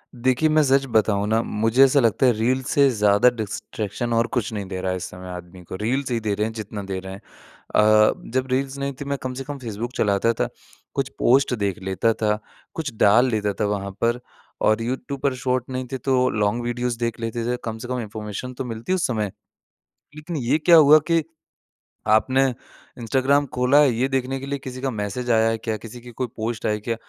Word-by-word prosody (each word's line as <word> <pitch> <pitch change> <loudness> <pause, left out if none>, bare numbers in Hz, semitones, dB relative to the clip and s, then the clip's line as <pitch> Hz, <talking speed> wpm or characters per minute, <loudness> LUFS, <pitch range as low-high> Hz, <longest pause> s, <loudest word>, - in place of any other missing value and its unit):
देखिए, 130 +5 +2
मैं 155 0 +4
सच 135 0 +3
बताऊँ 105 -3 +2
ना? 110 +1 +2
मुझे 115 +4 +3
ऐसा 135 +1 +5
लगता 115 +2 +2
है 125 - +6
रील्स 125 +4 0
से 140 -1 +5
ज़्यादा 105 0 +4
डिस्ट्रैक्शन 110 0 -4
और 115 0 +2
कुछ 115 -1 -1
नहीं 100 -2 -4
दे 95 -1 -5
रहा 95 - -1
है 95 - -1
इस 90 - -6
समय 90 0 -10
आदमी 90 0 -9
को। 85 - -8
रील्स 130 +4 -1
ही 120 - +1
दे 110 -2 -1
रहे 105 - 0
हैं 110 - -4
जितना 105 -2 -6
दे 95 -1 -4
रहे 95 0 -8
हैं। 95 - -10 0.5
अ, 110 0 +5 0.2
जब 130 0 0
रील्स 135 +1 -1
नहीं 140 0 -2
थी 145 - -4
मैं 140 0 -2
कम 130 0 -3
से 135 +1 -5
कम 145 +1 -6
फ़ेसबुक 115 -1 -5
चलाता 105 +2 +2
था - - -1 0.4
कुछ 135 -1 -1
पोस्ट 130 +1 +4
देख 100 -3 -2
लेता 95 +4 +1
था, 105 -1 0 0.3
कुछ 155 -7 -4
डाल 110 +6 +5
लेता 105 -2 0
था - - +3
वहाँ 100 -1 -2
पर। 120 +1 +1 0.4
और 110 +1 +3
यूट्यूब 130 +3 -4
पर 140 - +1
शॉर्ट 125 -1 0
नहीं 130 0 -3
थे 135 - -2
तो 130 0 +2
लॉन्ग 105 +2 0
वीडियोज़ 120 0 -2
देख 115 -1 -2
लेते 115 0 -3
थे। 125 - -1
कम 110 -1 -4
से 115 +2 -8
कम 125 0 -2
इन्फ़ॉर्मेशन 110 +3 -6
तो 130 +1 -5
मिलती 115 +9 -3
उस 185 - +1
समय। 110 -6 -2 0.9
लेकिन 160 +2 -6
ये 130 +2 +1
क्या 170 +2 +6
हुआ 155 -1 +8
कि 165 -1 +4 0.9
आपने 130 +5 +4 0.6
इंस्टाग्राम 135 +4 +2
खोला 125 +3 +4
है 140 - +5
ये 125 +4 +1
देखने 135 0 -1
के 135 - -7
लिए 140 0 -3
किसी 130 -1 -8
का 135 - -1
मैसेज 110 +3 -4
आया 115 0 +4
है 115 - 0
क्या? 110 -1 -3
किसी 115 +3 -10
की 120 0 -11
कोई 125 +2 -3
पोस्ट 110 0 -4
आई - - +2
है 105 - -3
क्या? 115 +2 -2
120 Hz, 225 wpm, -23 LUFS, 105-130 Hz, 0.9 s, हुआ